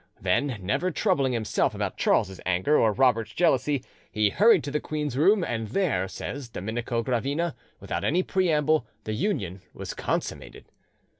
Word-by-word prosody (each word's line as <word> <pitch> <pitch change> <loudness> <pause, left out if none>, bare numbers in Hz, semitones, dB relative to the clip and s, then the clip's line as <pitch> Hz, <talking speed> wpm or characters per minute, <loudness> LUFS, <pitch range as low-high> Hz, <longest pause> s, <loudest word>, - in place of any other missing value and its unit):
Then, 115 +8 0
never 100 - 0
troubling 150 -8 +1
himself 110 -3 0
about - - -2
Charles's 95 0 +1
anger 95 +11 +1
or 110 - +4
Robert's 115 -2 +2
jealousy, 145 -5 +2 0.3
he 105 -1 +2
hurried 210 -6 +5
to 140 - -4
the 150 - 0
queen's 150 -4 -3
room, 185 +8 +4
and 115 -6 -2
there, 105 - 0
says 125 +6 -6
Domenico 115 +3 -3
Gravina, 140 +8 -1 0.3
without - - -4
any 180 +5 +2
preamble, 155 -6 +1 0.2
the 110 - -3
union 100 - -2
was - - -6
consummated. - - -4
135 Hz, 150 wpm, -26 LUFS, 110-155 Hz, 0.3 s, hurried